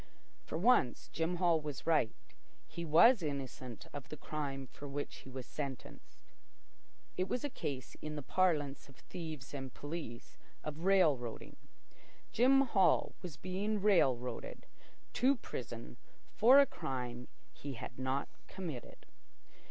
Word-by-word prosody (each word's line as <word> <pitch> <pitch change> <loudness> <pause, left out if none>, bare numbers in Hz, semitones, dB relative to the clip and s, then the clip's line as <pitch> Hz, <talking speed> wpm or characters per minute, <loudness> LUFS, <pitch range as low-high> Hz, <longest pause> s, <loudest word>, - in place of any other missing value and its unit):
For - - -3
once, 195 - +3
Jim 165 +2 -1
Hall 170 -3 +3
was 150 -3 -6
right. 155 -9 +3 0.6
He 170 - -6
was 195 +9 +7
innocent 130 -5 -5
of 145 -3 -7
the 155 - -6
crime 140 -2 -4
for 145 +3 -10
which 140 +1 -4
he - - -12
was 130 -1 -6
sentenced. 135 -3 -7 0.9
It 185 +1 +1
was 245 +5 -2
a 290 - -2
case, 130 - -5
in 155 0 -4
the 145 - -5
parlance 150 -5 +1
of 135 - -15
thieves 155 -5 -7
and 135 -2 -5
police, 145 -6 -7 0.2
of 155 +3 -5
"rail 185 -8 +5
roading." 120 -2 -7 0.8
Jim 265 +4 +5
Hall 210 -8 +3
was 170 -5 -7
being 200 +5 -1
"rail 185 -11 +5
roaded" 125 - -6 0.5
to 265 +3 +4
prison 120 - -7 0.4
for 245 +5 +7
a 280 - +8
crime 125 - -4 0.3
he 140 -1 -6
had 125 +1 -8
not 130 +1 0 0.2
committed. 165 -10 -7
150 Hz, 140 wpm, -35 LUFS, 130-185 Hz, 0.9 s, a